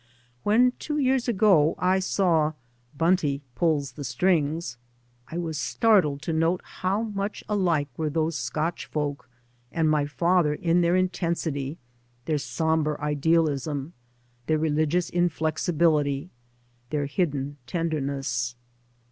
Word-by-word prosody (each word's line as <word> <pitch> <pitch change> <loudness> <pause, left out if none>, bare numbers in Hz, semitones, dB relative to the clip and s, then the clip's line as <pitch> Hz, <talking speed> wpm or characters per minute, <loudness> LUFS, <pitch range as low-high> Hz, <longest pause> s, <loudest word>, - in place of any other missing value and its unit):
When 235 - +4
two 300 -1 -3
years 265 -3 +2
ago 190 -9 +4
I 185 +1 +2
saw 170 -5 +2 0.2
" 120 +4 -29
Bunty 150 -5 +2
Pulls 155 -4 +1
the 145 - -8
Strings," 150 0 0 0.5
I 165 - -6
was 160 -3 -3
starded 180 -12 +2
to 165 - -2
note 165 +3 +1
how 195 +4 -2
much 205 -1 -4
alike 175 -8 +1
were 155 -1 -1
those 160 +1 0
Scotch 160 +2 -2
folk 145 -3 -3 0.4
and 165 -1 +1
my 150 -2 +2
father 155 +2 +2
in 170 +2 +2
their 170 +1 +3
intensity, 170 -5 -1 0.5
their 155 -2 0
sombre 160 0 0
idealism, 150 0 0 0.5
their 155 - +2
religious 155 +3 +1
inflexibility, 160 -3 +1 0.6
their 145 0 -1
hidden 145 -2 -2
tenderness. 135 -7 -2
160 Hz, 120 wpm, -26 LUFS, 145-175 Hz, 0.6 s, When